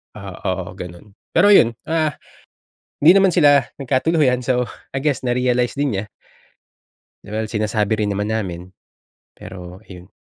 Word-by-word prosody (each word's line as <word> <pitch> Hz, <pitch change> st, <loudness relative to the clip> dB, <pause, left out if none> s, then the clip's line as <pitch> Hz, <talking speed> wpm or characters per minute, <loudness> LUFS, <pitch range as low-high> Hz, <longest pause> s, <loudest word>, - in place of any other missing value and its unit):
Ah, 100 Hz, -3 st, -9 dB
oo 95 Hz, -2 st, -3 dB
gano'n. 90 Hz, +2 st, -11 dB, 0.2 s
Pero 180 Hz, +5 st, +4 dB
'yon, 115 Hz, -10 st, +5 dB, 0.2 s
ah, 160 Hz, -1 st, +1 dB, 0.9 s
hindi 160 Hz, +4 st, +8 dB
naman 190 Hz, -3 st, +3 dB
sila 145 Hz, -4 st, +5 dB, 0.2 s
nagkatuluyan. 130 Hz, -1 st, +1 dB
So, 125 Hz, -1 st, +1 dB, 0.3 s
I 135 Hz, -, -2 dB
guess 145 Hz, -3 st, -1 dB
na 120 Hz, -, +1 dB
realize 125 Hz, -1 st, 0 dB
din 140 Hz, -4 st, -1 dB
niya. 100 Hz, -, -3 dB, 1.2 s
Well, 110 Hz, +1 st, -3 dB
sinasabi 110 Hz, 0 st, -1 dB
rin 105 Hz, -, 0 dB
naman 105 Hz, +2 st, -2 dB
namin. 95 Hz, -4 st, -5 dB, 0.6 s
Pero 90 Hz, -1 st, -11 dB
ayon, 90 Hz, 0 st, -13 dB
110 Hz, 140 wpm, -20 LUFS, 100-135 Hz, 1.2 s, hindi